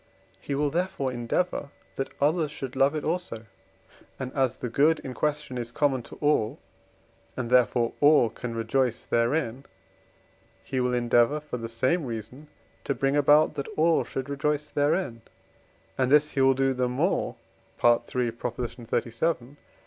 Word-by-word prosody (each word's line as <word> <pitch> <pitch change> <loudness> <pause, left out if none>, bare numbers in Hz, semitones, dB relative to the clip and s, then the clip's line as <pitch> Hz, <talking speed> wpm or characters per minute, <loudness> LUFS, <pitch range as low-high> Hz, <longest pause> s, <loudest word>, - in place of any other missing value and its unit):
he 140 - -4
will 145 0 0
therefore 170 -5 -1
endeavour 135 +6 -2 0.2
that 135 - -3
others 155 +2 +2
should 135 -3 -7
love 135 +3 +3
it 155 - -3
also; 160 -9 -3 0.7
and 130 -1 -5
as 130 -4 0
the - - -4
good 150 +7 +3
in 130 - -6
question 150 -3 -2
is 120 0 -5
common 135 -1 +1
to - - -12
all, 145 -8 +1 0.8
and 125 -2 -3
therefore 120 -1 +3
all 145 -4 +6
can 115 +1 -6
rejoice 120 +1 0
therein, 120 +1 0 1.0
he 130 - -3
will 125 0 +1
endeavour, 120 +4 +3
for 150 -4 -6
the 115 -1 -6
same 130 +9 +1
reason, 120 +4 -7 0.4
to 140 - -1
bring 135 +1 +1
about 145 +1 +5
that 140 - -4
all 165 +1 +3
should 130 0 -5
rejoice 150 +1 -1
therein, 145 -4 0 0.8
and 130 0 +2
this 150 +1 +5
he 135 - 0
will 135 0 +5
do 135 0 +2
the 125 -1 0
more 150 +10 0 0.4
(III. 120 0 +2
xxxvii.) 120 +3 -3
135 Hz, 150 wpm, -27 LUFS, 120-150 Hz, 1.0 s, all